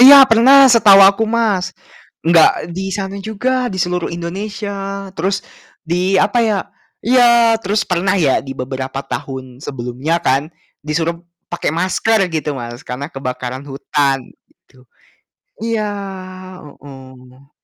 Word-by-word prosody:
Iya 275 +2 +10
pernah 265 +4 +6
setahu 205 -4 +7
aku, 200 +3 +4
Mas. 220 -5 0 0.5
Enggak 165 0 +3
di 190 +2 -4
sana 195 -1 -4
juga, 250 +5 -2
di 190 - -6
seluruh 180 -1 -2
Indonesia, 195 +2 -5
terus 195 +3 -1 0.4
di, 180 +3 0
apa 240 - +2
ya 220 -3 +1 0.5
iya, 235 -2 +4
terus 205 0 0
pernah 185 +1 0
ya 150 -8 +2
di 135 -1 -8
beberapa 130 +1 -5
tahun 130 -2 -7
sebelumnya 135 +4 -3
kan, 135 +2 +1 0.3
disuruh 165 +2 -2 0.3
pakai - - -1
masker 190 +3 +1
gitu 150 -2 -2
Mas, 120 -1 -7
karena 140 +5 -6
kebakaran 130 0 -5
hutan, 140 0 0 0.3
gitu. 130 0 -26 0.8
Iya, 225 -2 -1 0.8
heeh. 130 -2 -15
180 Hz, 125 wpm, -17 LUFS, 135-210 Hz, 0.8 s, Iya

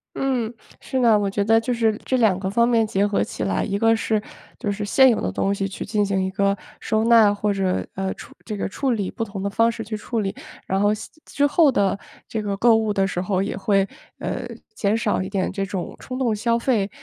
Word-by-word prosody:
嗯， 250 -5 -1 0.3
是 260 - -3
的， 230 -3 +5
我 205 -1 0
觉 200 +1 0
得 225 +2 +4
就 245 +2 -1
是 225 -2 +2
这 260 - 0
2 215 -6 +3
个 190 0 -2
方 235 +3 +3
面 230 -2 +3
结 200 0 +1
合 205 -1 +1
起 - - -5
来。 95 -1 0
一 200 - -1
个 225 +2 +4
是， 220 -1 0 0.4
就 205 - -2
是 205 +1 -4
现 260 +6 +5
有 230 - +1
的 95 - -1
东 195 - 0
西 195 -1 -2
去 190 - -6
进 210 0 +1
行 195 -1 0
一 190 - -2
个 200 +1 +1 0.2
收 220 0 0
纳， 225 -3 +6
或 205 0 0
者， 190 -2 -1
呃， 190 0 -2
处 - - -12
这 215 -2 -5
个 - - -2
处 265 +6 -1
理， 205 -5 -1
不 225 - -3
同 200 -2 -6
的 200 - 0
方 230 +3 +2
式 225 -1 -6
去 215 +1 -5
处 225 +2 -3
理。 195 -1 -2 0.3
然 190 +1 0
后 205 +1 +3
像 215 - -6 0.2
之 285 - 0
后 290 0 +4
的 200 -3 +1 0.3
这 220 - -3
个 200 -1 -3
购 230 +2 +5
物 220 -1 +1
的 195 -1 +1
时 180 -2 -2
候， 190 0 0
也 200 - -3
会， 195 0 +1 0.3
呃， 250 -1 -4 0.3
减 210 +1 0
少 215 -4 0
一 185 - -4
点 195 -2 -1
这 195 - -2
种 185 -2 -5
冲 255 - -6
动 240 -5 +1
消 230 +2 +1
费， 230 -5 +1
210 Hz, 265 characters per minute, -22 LUFS, 195-230 Hz, 0.4 s, 纳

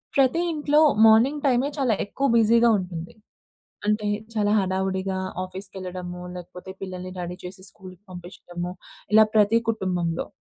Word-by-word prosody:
ప్రతి 275 +3 +3
ఇంట్లో 300 -1 +2 0.3
మార్నింగ్ 245 +7 +5
టైమే 260 +1 +3
చాలా 265 -6 +1
ఎక్కువ 275 +7 -1
బిజీగా 230 +1 +5
ఉంటుంది. 175 -3 -6 0.8
అంటే 210 0 +1 0.3
చాలా 205 -2 +1
హడావుడిగా 190 0 -1 0.3
ఆఫీస్‌కెళ్ళడము. 185 -1 -7
లేకపోతే, 180 +1 -9
పిల్లల్ని 185 -1 -6
రెడీ 175 0 -5
చేసి 185 +1 -9
స్కూల్‌కి 185 -2 -13
పంపించడము 175 0 -7 0.4
ఇలా 220 0 +8
ప్రతి 215 +1 +5
కుటుంబంలో. 180 -6 -1
190 Hz, 120 wpm, -24 LUFS, 180-225 Hz, 0.8 s, ఇలా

